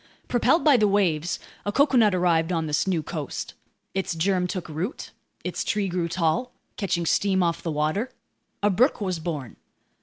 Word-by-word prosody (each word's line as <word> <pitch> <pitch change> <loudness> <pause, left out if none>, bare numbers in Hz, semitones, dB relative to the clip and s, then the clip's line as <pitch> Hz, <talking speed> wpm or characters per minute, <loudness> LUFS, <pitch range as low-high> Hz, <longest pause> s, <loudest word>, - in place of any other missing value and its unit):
Propelled 285 +7 +3
by 295 -4 +6
the 215 -2 +4
waves, 175 -5 +1 0.3
a 205 - -1
coconut 240 -7 +4
arrived 170 -2 +2
on 165 -2 0
this 150 +4 0
new 175 -5 +1
coast. 150 -3 -5 0.4
Its 190 -3 -2
germ 180 +2 +1
took 185 -1 -4
root. 165 - -4 0.3
Its - - -2
tree 205 -2 0
grew 175 -1 -1
tall, 170 +8 0 0.2
catching 180 -5 -1
steam 190 +2 +2
off 170 -1 0
the 170 - -3
water. 155 - 0 0.5
A 205 - +4
brook 245 +9 +3
was 185 -5 -2
born. 155 -7 -5
180 Hz, 170 wpm, -25 LUFS, 165-205 Hz, 0.5 s, by